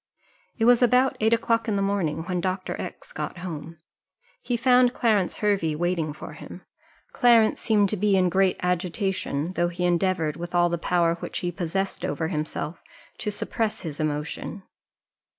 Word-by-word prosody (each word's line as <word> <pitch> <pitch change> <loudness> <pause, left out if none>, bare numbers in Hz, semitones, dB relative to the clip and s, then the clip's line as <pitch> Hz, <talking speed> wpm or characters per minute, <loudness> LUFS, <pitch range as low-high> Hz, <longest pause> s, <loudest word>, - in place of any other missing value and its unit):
It 225 - +1
was 245 0 +6
about 250 +2 +4
eight 220 +1 +2
o'clock 230 0 +1
in 215 - 0
the 200 - 0
morning 185 -6 -1
when 180 0 -2
Dr. 185 +1 -2
X - - -8
got - - -5
home; 165 -2 -7 0.6
he 245 - -1
found 250 +1 +4
Clarence 215 -6 +2
Hervey 195 -7 +1
waiting 170 -1 -1
for 150 - -9
him. - - -11 0.5
Clarence 230 -3 +4
seemed 210 -3 +3
to 215 - 0
be 200 0 +3
in 185 -1 +3
great 190 +1 +2
agitation, 180 -3 -1
though 175 -1 +1
he 180 +1 -2
endeavoured, 175 -3 +1
with 175 +1 -6
all 175 0 +4
the 170 -1 -2
power 170 -1 +1
which - - -5
he 175 - 0
possessed 190 +2 -3
over 160 -1 -2
himself, 155 0 -4 0.4
to 210 - -2
suppress 215 +1 -2
his 155 -4 -6
emotion. 155 +5 -3
185 Hz, 170 wpm, -25 LUFS, 170-215 Hz, 0.6 s, was